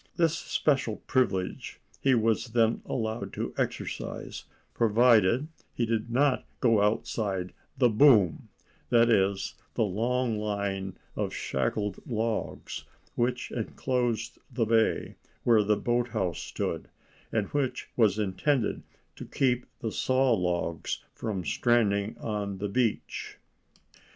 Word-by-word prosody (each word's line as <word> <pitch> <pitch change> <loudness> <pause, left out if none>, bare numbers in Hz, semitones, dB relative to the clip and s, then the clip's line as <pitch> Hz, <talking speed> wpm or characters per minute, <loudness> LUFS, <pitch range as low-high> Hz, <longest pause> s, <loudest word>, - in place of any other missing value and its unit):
This 165 -3 +2
special 135 -7 0
privilege 95 -8 -1 0.2
he 135 -2 +3
was 115 +1 +1
then 115 0 +2
allowed 110 -4 -3
to - - -3
exercise, - - -4 0.3
provided 115 +2 +4 0.3
he 120 - +1
did 115 0 -1
not 130 +2 +2 0.2
go 115 -4 +4
outside 100 -3 -1 0.2
the 125 -2 +5
"boom"—that 115 - +3
is, 95 -2 +2 0.2
the 115 - +2
long 115 +3 0
line 100 -2 -2 0.2
of - - -2
shackled 100 +9 -1
logs 115 -2 -3 0.3
which 120 +1 -1
enclosed 120 -1 -2
the 120 -2 0
bay 110 0 +1 0.3
where 115 -3 +5
the 105 0 +2
boathouse 115 -7 0
stood, - - -3 0.4
and 105 -3 0
which 130 -3 -1
was 110 -4 +3
intended 110 +5 0 0.4
to - - -7
keep 125 -2 0
the 110 - -2
saw 130 +1 +2
logs 90 -4 -1
from 100 -6 -4
stranding 105 -1 +2
on 105 -3 -3
the 100 +1 -3
beach. 115 +1 -1
110 Hz, 115 wpm, -28 LUFS, 100-120 Hz, 0.4 s, the